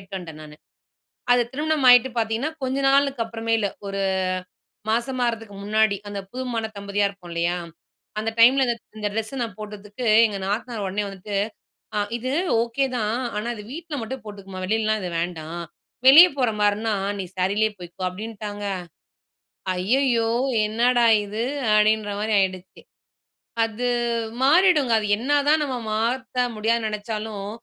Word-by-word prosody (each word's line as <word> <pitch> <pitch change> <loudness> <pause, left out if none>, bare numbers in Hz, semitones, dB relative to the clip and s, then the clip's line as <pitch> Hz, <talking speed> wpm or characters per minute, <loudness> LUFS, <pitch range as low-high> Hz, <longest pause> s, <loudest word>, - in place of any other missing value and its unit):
வந்துட்டேன் 185 -4 -8
நானு. 150 0 -12 0.8
அது 245 -1 +4
திருமணம் 300 -1 0
ஆயிட்டு 245 +1 +7
பாத்தீங்கன்னா, 225 +7 -1
கொஞ்ச 260 +1 -1
நாளுக்கு 275 -3 +3
அப்புறம்தான். 225 -1 -1 0.2
ஒரு 195 0 -3 0.9
மாசமா 245 +2 0
ஆகிறதுக்கு 225 -3 -4
முன்னாடி. 215 -1 +2
அந்த 200 -1 -4
புது 255 +1 -4
மண 225 - -1
தம்பதியா 200 0 0
இருப்போம் 185 -3 -12
இல்லையா? 170 +1 0 0.6
அந்த 220 - -1
டைம்ல, 265 +4 +7
இந்த 240 - +1 0.2
இந்த 210 -1 -1
ட்ரெஸ்ஸ 225 +5 -3
நான் 220 -4 -7
போட்டதுக்கு, 210 +3 -6 0.2
எங்க 205 -2 -5
நாத்தனார் 215 +1 -3
உடனே 205 +2 -1
வந்துட்டு, 195 +1 -7 0.8
"இது 255 +2 -3 0.3
ஓகேதான். 240 -2 -1 0.2
ஆனா, 215 +3 -3
இது 210 - -9
வீட்ல 330 -2 -6
மட்டும் 260 +2 -6
போட்டுக்கமா. 195 -2 -9
வெளிலலாம் 215 +1 +1
இது 180 - -4
வேண்டாம். 170 0 -5 0.4
வெளியே 325 +7 +10
போற 250 -3 +2
மாதிரின்னா, 210 +2 +2 0.3
நீ 190 - -3
சாரீலேயே 205 +4 +1
போய்க்கோ." 175 +1 -9
அப்படின்ட்டாங்க. 205 +1 -6 1.1
ஐயயோ! 235 +3 +2 0.4
என்னடா 240 +3 +2 0.2
இது? 210 +2 -5 0.3
அப்படின்ற 215 0 +3
மாதிரி 220 +1 -1
ஆகிடுச்சு. 185 -1 -2 0.8
அது 225 +2 -3 0.6
மாறிடுங்க. 300 -3 +5
அது 210 - -2
என்னதா 290 +4 +2
நம்ம 265 -3 -3 0.2
மாத்த 250 +3 0
முடியாதுன்னு 225 +1 +1
நினச்சாலும், 210 -1 -5
220 Hz, 130 wpm, -23 LUFS, 200-250 Hz, 1.1 s, வெளியே